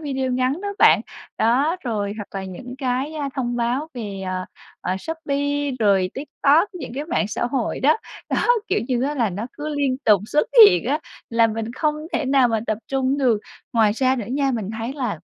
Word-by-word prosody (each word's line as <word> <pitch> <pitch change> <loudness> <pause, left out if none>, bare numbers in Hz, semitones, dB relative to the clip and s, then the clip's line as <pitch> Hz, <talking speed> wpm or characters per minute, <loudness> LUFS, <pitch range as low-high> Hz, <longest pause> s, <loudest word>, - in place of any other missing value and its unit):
video 265 -4 -2
ngắn 255 +6 0
đó 410 - -3
bạn, - - +6 0.4
đó, 270 +9 +2
rồi, 205 -4 -2
hoặc 205 -2 -7
là 190 - -6
những 245 +7 -8
cái, 265 +3 -1
a, 290 -2 -2
thông 245 -3 -2
báo 245 +6 -1
về, 205 -5 -5
ờ, 185 0 -2 0.4
ờ, 185 - -2
Shopee, 285 +1 -2
rồi 195 -4 +3
TikTok, 295 +5 +2
những 350 - -7
cái 285 - -3
mạng 305 - -1
xã 215 - -2
hội 250 -2 -2
đó. 300 +7 +4 0.3
Đó, - - +1 0.2
kiểu - - +1
như 250 -2 +1
á, 290 +2 0
là 235 -7 +1
nó 200 +6 -4
cứ 295 +1 -6
liên 270 -3 +1
tục 210 -3 +5
xuất 300 +6 +1 0.2
hiện 410 - +3
á, 285 +5 +1 0.3
làm 230 -1 +3
mình 225 +1 -4
không 300 +3 0 0.2
thể - - 0
nào 265 -2 +4
mà 225 -2 0
tập 215 - -1
trung 270 +1 0
được. 240 -6 +2 0.3
Ngoài 220 -3 +4
ra 260 +3 +1
nữa 230 -5 -4
nha, 275 +2 +1
mình 220 -5 -3
thấy 230 +3 -3
là 255 - -3
255 Hz, 205 wpm, -22 LUFS, 220-285 Hz, 0.4 s, bạn